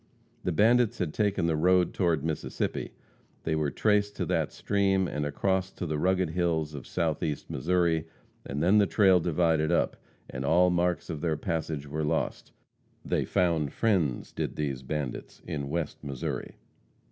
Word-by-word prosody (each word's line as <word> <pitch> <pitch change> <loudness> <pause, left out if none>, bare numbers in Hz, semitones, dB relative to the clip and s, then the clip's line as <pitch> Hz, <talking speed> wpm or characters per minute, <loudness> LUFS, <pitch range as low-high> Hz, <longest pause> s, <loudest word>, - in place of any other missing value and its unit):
The 90 - 0
bandits 115 +6 +3
had 85 -4 -2
taken 100 -5 +1
the 80 -1 +2
road 90 +2 +3
toward 85 -6 +1
the - - -3
Mississippi. 80 -2 -3 0.5
They 80 - -1
were 75 -2 0
traced 105 +3 +1
to - - -2
that - - 0
stream 95 -2 +1
and 75 -2 -2
across 95 +5 0
to 90 - -5
the 75 -2 -2
rugged 95 -1 +1
hills 80 -3 0
of 70 - -8
Southeast 80 -3 -2
Missouri, 85 +2 +1 0.4
and 70 +2 -3
then 100 +5 +5
the 100 - +4
trail 95 -3 +5
divided 80 -1 +1
up, 85 - +1 0.3
and 65 - -5
all 90 +5 +4
marks 90 0 0
of 75 -2 -5
their 80 -2 0
passage 80 -3 -3
were 75 +2 -3
lost. 80 +2 -2 0.5
They - - 0
found 80 -5 +1
friends, 90 - 0
did - - -3
these 70 -4 -2
bandits, 70 -1 -5
in 70 -2 -4
West 80 0 -3
Missouri. 70 -3 -4
85 Hz, 165 wpm, -28 LUFS, 75-90 Hz, 0.5 s, then